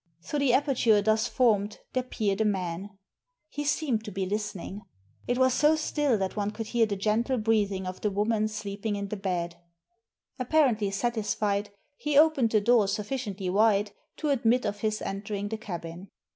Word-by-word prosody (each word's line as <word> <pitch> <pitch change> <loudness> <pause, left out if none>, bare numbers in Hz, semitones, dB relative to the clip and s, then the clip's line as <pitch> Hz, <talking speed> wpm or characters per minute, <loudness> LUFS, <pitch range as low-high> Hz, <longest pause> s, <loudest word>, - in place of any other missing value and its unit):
Through 295 - -2
the 275 -3 +3
aperture 250 -6 +3
thus 220 +1 +2
formed 210 -5 +2 0.2
there 255 - +1
peered 215 -5 -1
a - - +4
man. 195 -1 -2 0.5
He 290 - -4
seemed 285 -6 0
to 210 - -6
be 195 0 -2
listening. 205 0 -4 0.5
It 245 - +1
was 260 0 +4
so 300 +3 +4
still 295 -5 +1
that 190 -1 -2
one 205 -1 -1
could 220 +1 -5
hear 235 -2 +3
the 205 - -2
gentle 220 +6 0
breathing 210 -4 +1
of 185 0 -6
the 210 - +1
woman 210 +2 +1
sleep 210 -2 -6
ing 215 -2 0
in 200 0 -4
the 215 - -3
bed. 175 -4 -3 0.8
Apparently 250 -6 +2
satisfied, 210 -1 -1 0.3
he 295 -1 0
opened 295 -6 +5
the 215 -1 +3
door 230 -1 +4
sufficiently 205 -2 -3
wide 205 0 +3 0.3
to 305 - -2
admit 250 -1 +2
of 205 -1 -2
his 215 0 -1
entering 200 +1 -4
the 220 - -3
cabin. 175 -2 -7
215 Hz, 175 wpm, -28 LUFS, 200-240 Hz, 0.8 s, opened